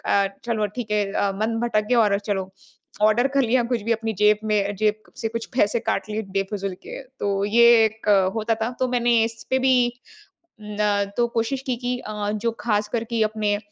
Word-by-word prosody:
अ, 200 Hz, -1 st, +3 dB, 0.2 s
चलो 220 Hz, -3 st, 0 dB
ठीक 230 Hz, -4 st, -5 dB
है 210 Hz, -1 st, +2 dB
अ, 200 Hz, -, +1 dB
मन 220 Hz, +3 st, -1 dB
भटक 215 Hz, -3 st, +1 dB
गया 245 Hz, -1 st, +4 dB
और 200 Hz, -2 st, +3 dB
चलो 195 Hz, -2 st, -3 dB, 0.5 s
ऑर्डर 215 Hz, +4 st, +4 dB
कर 275 Hz, 0 st, +1 dB
लिया 240 Hz, +1 st, +2 dB
कुछ 230 Hz, -4 st, 0 dB
भी। 230 Hz, +2 st, 0 dB
अपनी 225 Hz, 0 st, -2 dB
जेब 210 Hz, 0 st, +4 dB
में 205 Hz, -2 st, 0 dB
जेब 215 Hz, +1 st, -1 dB
से 225 Hz, -, -2 dB
कुछ 230 Hz, 0 st, -5 dB
पैसे 220 Hz, 0 st, +3 dB
काट 225 Hz, -, -2 dB
लिए 215 Hz, +1 st, -2 dB
बेफिज़ूल 195 Hz, -1 st, -2 dB
के। -, -, -8 dB, 0.2 s
तो 200 Hz, -1 st, 0 dB
ये 230 Hz, +3 st, +4 dB, 0.2 s
एक 220 Hz, 0 st, -3 dB, 0.3 s
होता 225 Hz, 0 st, 0 dB
था। 235 Hz, -, 0 dB
तो 255 Hz, -, +2 dB
मैंने 240 Hz, -1 st, +1 dB
इस 225 Hz, 0 st, -6 dB
पे 260 Hz, -, +3 dB
भी 260 Hz, 0 st, +3 dB, 0.9 s
न 210 Hz, 0 st, -7 dB, 0.4 s
तो 240 Hz, 0 st, +3 dB
कोशिश 235 Hz, +3 st, -2 dB
की 255 Hz, -2 st, 0 dB
कि 245 Hz, 0 st, -3 dB
अ, 210 Hz, -2 st, -4 dB
जो 215 Hz, +2 st, -1 dB
खास 210 Hz, -2 st, 0 dB
करके 230 Hz, 0 st, -1 dB
अपने 215 Hz, -1 st, 0 dB
220 Hz, 200 wpm, -23 LUFS, 210-235 Hz, 0.9 s, गया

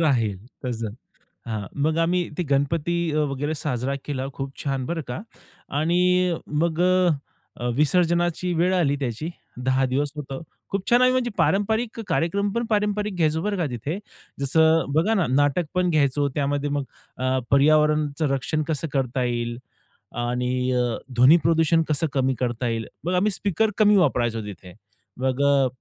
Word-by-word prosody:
राहील 115 Hz, -, +1 dB, 0.3 s
तसं. 115 Hz, -4 st, -3 dB, 0.5 s
हां. 110 Hz, -3 st, -3 dB, 0.2 s
मग 155 Hz, +1 st, +1 dB
आम्ही 175 Hz, +1 st, +1 dB
ते 180 Hz, -, 0 dB
गणपती 145 Hz, +4 st, +1 dB, 0.2 s
अ, 150 Hz, -, -1 dB
वगैरे 145 Hz, +3 st, -2 dB
साजरा 135 Hz, -2 st, -2 dB
केला, 135 Hz, -2 st, -3 dB
खूप 135 Hz, -1 st, -5 dB
छान 135 Hz, -2 st, -1 dB
बरं 165 Hz, +3 st, -2 dB
का. 125 Hz, -, -4 dB, 0.6 s
आणि 180 Hz, +2 st, +2 dB, 0.3 s
मग 170 Hz, 0 st, 0 dB
अ, 185 Hz, 0 st, +4 dB, 0.5 s
अ, 120 Hz, -, -2 dB
विसर्जनाची 175 Hz, +3 st, +2 dB
वेळ 175 Hz, +3 st, +2 dB
आली 150 Hz, -6 st, +2 dB
त्याची 130 Hz, +4 st, -3 dB, 0.4 s
10 130 Hz, 0 st, +2 dB
दिवस 140 Hz, +2 st, 0 dB
होतं. 135 Hz, -1 st, -6 dB, 0.3 s
खूप 195 Hz, -1 st, -3 dB
छान 240 Hz, +1 st, +5 dB
आम्ही 255 Hz, 0 st, +5 dB
म्हणजे 255 Hz, -1 st, +1 dB
पारंपरिक 220 Hz, +4 st, +1 dB
कार्यक्रम 190 Hz, +4 st, 0 dB
पण 235 Hz, 0 st, -1 dB
पारंपरिक 210 Hz, -1 st, 0 dB
घ्यायचो 160 Hz, -2 st, +1 dB
बरं 205 Hz, +2 st, -1 dB
का 175 Hz, -, 0 dB
तिथे, 130 Hz, -, -4 dB, 0.4 s
जसं 160 Hz, +2 st, +3 dB
बघा 170 Hz, +9 st, +2 dB
ना 190 Hz, -6 st, +2 dB
नाटक 145 Hz, +5 st, +2 dB
पण 180 Hz, 0 st, +1 dB
घ्यायचो, 145 Hz, -2 st, +2 dB
त्यामध्ये 145 Hz, 0 st, 0 dB
मग 145 Hz, 0 st, -1 dB, 0.3 s
अ, 130 Hz, +1 st, 0 dB
पर्यावरणचं 150 Hz, +1 st, +3 dB
रक्षण 155 Hz, +3 st, -1 dB
कसं 160 Hz, 0 st, -2 dB
करता 130 Hz, -1 st, 0 dB
येईल 120 Hz, -1 st, -2 dB, 0.7 s
आणि 125 Hz, +1 st, -1 dB
अ, 125 Hz, -2 st, 0 dB, 0.2 s
ध्वनी 130 Hz, +8 st, +7 dB
प्रदूषण 165 Hz, 0 st, +3 dB
कसं 155 Hz, +2 st, +1 dB
कमी 135 Hz, -1 st, +2 dB
करता 120 Hz, -1 st, -1 dB
येईल. 115 Hz, -2 st, -2 dB, 0.2 s
मग 180 Hz, -, 0 dB
आम्ही 200 Hz, +4 st, +2 dB
स्पीकर 205 Hz, +3 st, 0 dB
कमी 210 Hz, -1 st, +5 dB
वापरायचो 120 Hz, -10 st, +1 dB
तिथे. 90 Hz, -3 st, -10 dB, 0.5 s
मग 130 Hz, +1 st, 0 dB
अ, 140 Hz, -2 st, +4 dB
150 Hz, 160 wpm, -24 LUFS, 130-175 Hz, 0.7 s, ध्वनी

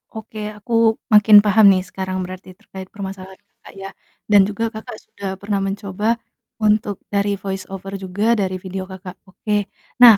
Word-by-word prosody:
Oke, 220 Hz, 0 st, -9 dB, 0.2 s
aku 220 Hz, +3 st, -7 dB, 0.4 s
makin 210 Hz, 0 st, +8 dB
paham 210 Hz, +1 st, +5 dB
nih 185 Hz, -1 st, +2 dB
sekarang 190 Hz, 0 st, -4 dB
berarti 185 Hz, +1 st, -10 dB
terkait 190 Hz, -1 st, -10 dB
permasalahan 190 Hz, -1 st, -8 dB
Kakak -, -, -18 dB
ya, 195 Hz, 0 st, -7 dB, 0.4 s
dan 205 Hz, -1 st, +8 dB
juga 210 Hz, +2 st, -3 dB
Kakak 220 Hz, 0 st, -8 dB
sudah 200 Hz, -, -8 dB
pernah 200 Hz, 0 st, -2 dB
mencoba 200 Hz, +3 st, -1 dB, 0.4 s
untuk 210 Hz, -2 st, +1 dB, 0.2 s
dari 200 Hz, 0 st, +1 dB
voice 195 Hz, 0 st, -6 dB
over 195 Hz, 0 st, -7 dB
juga, 205 Hz, +5 st, +1 dB
dari 190 Hz, -4 st, -1 dB
video 185 Hz, +1 st, -6 dB
Kakak. 190 Hz, -1 st, -10 dB
Oke, 205 Hz, +2 st, -2 dB, 0.3 s
nah, 235 Hz, -4 st, +10 dB
200 Hz, 160 wpm, -20 LUFS, 190-210 Hz, 0.4 s, nah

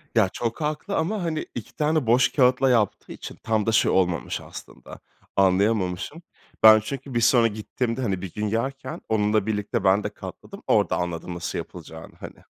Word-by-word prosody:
Ya, 105 Hz, -4 st, +4 dB
çok 115 Hz, +7 st, -4 dB
haklı 155 Hz, +7 st, -2 dB
ama, 185 Hz, +4 st, -1 dB
hani, 160 Hz, -2 st, -2 dB
2 -, -, -7 dB
tane 150 Hz, -4 st, 0 dB
boş 125 Hz, +1 st, +4 dB
kâğıtla 130 Hz, -1 st, +3 dB
yaptığı 115 Hz, -5 st, +1 dB
için -, -, -8 dB
tam 110 Hz, -2 st, 0 dB
da 115 Hz, -, +1 dB
şey 110 Hz, -, +3 dB
olmamış 85 Hz, -8 st, 0 dB
aslında, 60 Hz, -, -11 dB, 0.4 s
anlayamamışım. 95 Hz, -, +1 dB, 0.4 s
Ben 110 Hz, 0 st, +9 dB
çünkü 135 Hz, +4 st, -7 dB
bir 120 Hz, -, +1 dB
sonra 115 Hz, 0 st, +5 dB
gittiğimde, 115 Hz, +3 st, -3 dB
hani, 95 Hz, -6 st, -1 dB
bir 95 Hz, -4 st, -7 dB
gün 105 Hz, 0 st, -2 dB
yerken 130 Hz, +4 st, -3 dB
onunla 105 Hz, -1 st, +2 dB
birlikte 105 Hz, +1 st, -2 dB
ben 100 Hz, +2 st, +3 dB
de -, -, -2 dB
katladım, -, -, -10 dB
orada -, -, +2 dB
anladım 90 Hz, 0 st, -4 dB
nasıl 85 Hz, 0 st, -4 dB
yapılacağını -, -, -9 dB
hani. -, -, -9 dB
110 Hz, 175 wpm, -24 LUFS, 100-130 Hz, 0.4 s, Ben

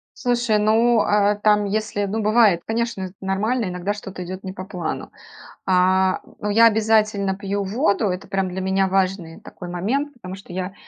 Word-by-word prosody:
Слушай, 240 Hz, -3 st, +1 dB
ну, 225 Hz, +2 st, +3 dB
э, 205 Hz, 0 st, +2 dB
там, 210 Hz, -1 st, +4 dB
если, 205 Hz, 0 st, -2 dB
ну, 215 Hz, +3 st, -2 dB
бывает, 210 Hz, -5 st, +4 dB
конечно, 230 Hz, -3 st, -2 dB
это 185 Hz, -1 st, -7 dB
нормально, 215 Hz, +5 st, -1 dB
иногда 180 Hz, +2 st, -3 dB
что-то 195 Hz, -3 st, -8 dB
идёт 185 Hz, +2 st, -7 dB
не 190 Hz, -, -5 dB
по 185 Hz, 0 st, -8 dB
плану. 180 Hz, -4 st, -5 dB, 0.5 s
А, 185 Hz, 0 st, +3 dB, 0.2 s
ну, 210 Hz, -, -3 dB
я 230 Hz, +3 st, +6 dB
обязательно 215 Hz, -3 st, +2 dB
пью 200 Hz, 0 st, -3 dB
воду, 215 Hz, +2 st, 0 dB
это, 185 Hz, +2 st, -4 dB
прям, 195 Hz, -1 st, 0 dB
для 190 Hz, +1 st, -5 dB
меня 190 Hz, 0 st, +1 dB
важный 185 Hz, -3 st, -1 dB
такой 180 Hz, -, -10 dB
момент. 250 Hz, +12 st, -2 dB
Потому 190 Hz, -7 st, -9 dB
что 195 Hz, -2 st, -12 dB
я 185 Hz, +1 st, -4 dB
200 Hz, 175 wpm, -22 LUFS, 185-220 Hz, 0.5 s, я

